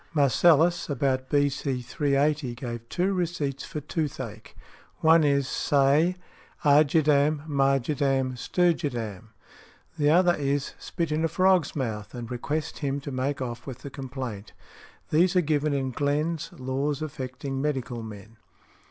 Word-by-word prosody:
Marcellus, 160 +5 +4
about 135 -2 0
B. 145 -1 +3
C. 135 -2 -3
380, 140 0 0
gave 120 -2 -6
two 185 +3 0
receipts 160 -7 -2
for 150 - -5
toothache. 135 -8 -5 0.5
One 160 0 +6
is, 140 -2 +2
"Say, 145 +7 +2 0.5
'argidam, 150 0 +4
margidam, 135 -1 +1
sturgidam;'" 120 - -1 0.7
the 145 0 +3
other 175 +2 +5
is, 140 -2 -1
"Spit 170 -3 -3
in 155 +1 0
a - - +3
frog's 185 0 +2
mouth 110 -6 -4
and 120 0 -7
request 150 +5 -3
him 140 -1 -1
to 140 - -6
make 135 +1 -2
off 120 0 -6
with 130 -4 -8
the 140 - -7
complaint." 130 -6 -6 0.6
These 175 +4 +3
are 180 - +5
given 150 -1 0
in 135 -2 -1
Glenn's 145 +4 -1
"Laws 135 +3 -2
affecting 135 -2 -5
Medical 130 -5 -2
Men." 110 0 -10
140 Hz, 135 wpm, -26 LUFS, 130-155 Hz, 0.7 s, One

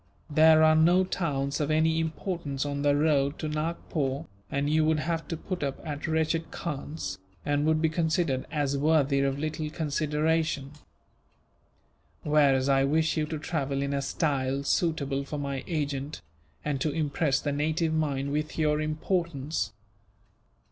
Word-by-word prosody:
There 155 +1 +6
are 155 0 +6
no 175 +4 +5
towns 145 -7 -1
of 150 -1 0
any 160 +1 +3
importance 160 -3 -3
on 140 0 -2
the 145 0 +3
road 145 -2 +2
to 155 - -3
Nagpore, 150 -2 -2 0.2
and 140 +1 -1
you 155 +1 +3
would 155 0 +3
have 165 +1 -2
to 165 - -3
put 185 +2 -5
up 140 -1 -2
at 150 -1 -4
wretched 160 +1 0
khans, 140 - -5 0.3
and 145 +1 +1
would 160 0 +2
be - - +5
considered 160 -4 0
as 145 -3 0
worthy 145 -1 +3
of 135 0 +1
little 155 +1 -3
consideration; 155 -1 0 1.5
whereas 140 -3 +3
I 135 -1 +4
wish 155 +3 +2
you 155 -2 0
to 155 - -3
travel 140 -3 -2
in 140 0 -2
a 140 - 0
style 140 -2 -1
suitable 140 -3 0
for 150 +2 -5
my 140 -2 -3
agent, 145 - -3 0.4
and 140 -3 -1
to 155 - +1
impress 145 -1 0
the 145 - -2
native 155 +3 0
mind 140 -3 0
with 150 +1 -2
your 150 -1 +2
importance. 155 - -1
150 Hz, 155 wpm, -28 LUFS, 140-160 Hz, 1.5 s, There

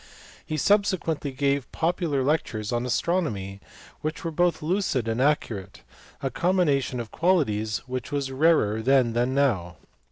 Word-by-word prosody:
He 155 - -4
subsequently 175 -5 +1
gave 140 0 -1
popular 165 -4 0
lectures 125 -7 -1
on 120 +1 -1
astronomy 115 - -1 0.4
which 155 +1 -4
were 165 - -2
both 175 0 +1
lucid 160 - 0
and 115 +2 0
accurate, 110 -9 -1 0.4
a 135 - -1
combination 145 -7 +1
of 115 -2 -6
qualities 110 - +1
which 130 +1 -5
was 140 -2 -2
rarer 130 -7 +3
then 125 -1 +3
than 120 +3 0
now. 100 - +1
140 Hz, 135 wpm, -25 LUFS, 115-160 Hz, 0.4 s, rarer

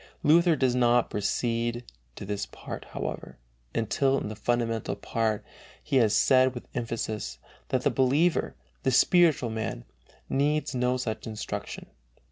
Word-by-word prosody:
Luther 170 +2 +5
does 130 -4 +2
not 120 -1 +3
proceed 115 +3 -1 0.3
to - - -7
this 100 0 -3
part, - - -8
however, - - -6 0.4
until 135 +4 +1
in 105 - -3
the 110 - -6
fundamental 115 -1 -1
part 110 +1 -2 0.4
he 140 -3 +1
has 110 -4 +4
said 130 +1 +4
with 120 - -8
emphasis, 115 -2 -3 0.3
that - - 0
the - - +3
believer, 145 +7 +2 0.3
the 135 - +1
spiritual 145 -2 +4
man, 110 - -4 0.4
needs 150 +2 0
no 125 0 +1
such 110 -3 -4
instruction 110 -1 -5
(I. - - -31
120 Hz, 140 wpm, -27 LUFS, 110-135 Hz, 0.4 s, Luther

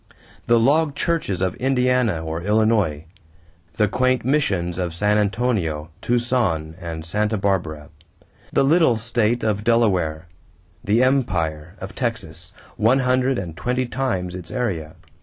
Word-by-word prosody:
The 120 0 +5
log 145 +4 +2
churches 145 - -1
of 95 - 0
Indiana 125 -8 +1
or 80 +1 -3
Illinois 105 -6 +1 0.7
the 105 -2 +2
quaint 130 +3 +1
missions 95 - 0
of 85 -2 -2
San 105 +4 +2
Antonio, 95 -8 -1
Tucson, 120 -10 0
and 80 -2 -6
Santa 105 +5 0
Barbara! 85 -7 -1 0.6
The - - +3
little 150 -4 +4
state 115 +1 0
of 105 -1 0
Delaware 95 -9 +1 0.6
the 110 +5 +3
empire 85 - 0
of 95 +3 -8
Texas, 90 - -4 0.3
one 115 +5 +4
hundred 130 0 +1
and 85 -5 -5
twenty 125 +6 -1
times 115 -8 -2
its 90 -2 -8
area! 95 -12 -3
105 Hz, 130 wpm, -22 LUFS, 85-125 Hz, 0.7 s, The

